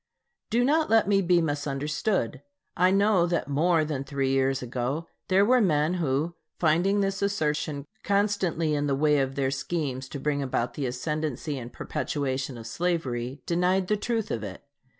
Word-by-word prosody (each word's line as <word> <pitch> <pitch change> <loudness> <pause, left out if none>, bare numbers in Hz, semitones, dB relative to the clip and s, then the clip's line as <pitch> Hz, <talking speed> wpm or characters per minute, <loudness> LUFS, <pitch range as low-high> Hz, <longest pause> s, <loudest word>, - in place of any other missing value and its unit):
Do 240 +3 +2
not 310 +3 +2
let 225 -2 +4
me 200 -1 +4
be 175 -2 +3
misunderstood. 150 +6 -1 0.3
I 180 +1 +4
know 195 -2 +3
that 170 -5 -1
more 155 +3 +2
than 145 -3 -3
three 135 -1 -1
years 135 0 +1
ago 125 +6 -2 0.2
there 195 +2 +4
were 250 +2 +4
men 155 -4 +2
who, 150 +3 0 0.2
finding 175 +5 +2
this 195 0 -1
assertion 150 -7 -1 0.2
constantly 200 -6 +1
in 145 0 0
the 140 - +1
way 150 +1 +3
of 135 0 -1
their 135 -1 0
schemes 135 -2 -3
to 140 - -6
bring 145 0 0
about 125 -3 -1
the 140 -3 -2
ascendency 150 +2 -3
and 120 0 -8
perpetuation 135 -2 -3
of 115 - -9
slavery, 130 -3 -2
denied 180 +2 +1
the 210 - +3
truth 225 +1 -2
of 110 - -2
it. 95 -3 -7
150 Hz, 170 wpm, -27 LUFS, 135-185 Hz, 0.3 s, let